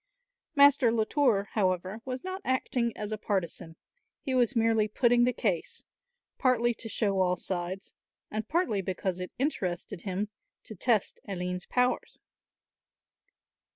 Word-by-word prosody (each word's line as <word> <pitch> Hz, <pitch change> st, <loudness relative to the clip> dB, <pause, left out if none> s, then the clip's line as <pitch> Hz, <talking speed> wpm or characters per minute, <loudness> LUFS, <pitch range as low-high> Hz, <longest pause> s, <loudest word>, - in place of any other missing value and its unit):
Master 280 Hz, -4 st, +6 dB
Latour, 225 Hz, -2 st, +2 dB
however, 185 Hz, +1 st, 0 dB
was 255 Hz, -1 st, -4 dB
not 375 Hz, +1 st, -5 dB
acting 250 Hz, -2 st, 0 dB
as 210 Hz, 0 st, -4 dB
a 215 Hz, -, -3 dB
partisan; 170 Hz, -5 st, -2 dB, 0.4 s
he 265 Hz, -, -3 dB
was 250 Hz, 0 st, +2 dB
merely 225 Hz, -2 st, +3 dB
putting 240 Hz, +2 st, +3 dB
the 250 Hz, -, +3 dB
case, 200 Hz, -9 st, -2 dB, 0.6 s
partly 240 Hz, -3 st, +3 dB
to 225 Hz, -, -6 dB
show 200 Hz, -2 st, +1 dB
all 180 Hz, -1 st, +2 dB
sides 185 Hz, +1 st, -4 dB, 0.4 s
and 215 Hz, +1 st, -3 dB
partly 285 Hz, -, +1 dB
because 185 Hz, 0 st, -2 dB
it 180 Hz, -, -5 dB
interested 185 Hz, -, -2 dB
him 200 Hz, +1 st, -2 dB, 0.3 s
to -, -, -9 dB
test 215 Hz, +1 st, +1 dB
Aline's 180 Hz, -2 st, -4 dB
powers. 250 Hz, 0 st, 0 dB
215 Hz, 130 wpm, -29 LUFS, 185-250 Hz, 0.6 s, Master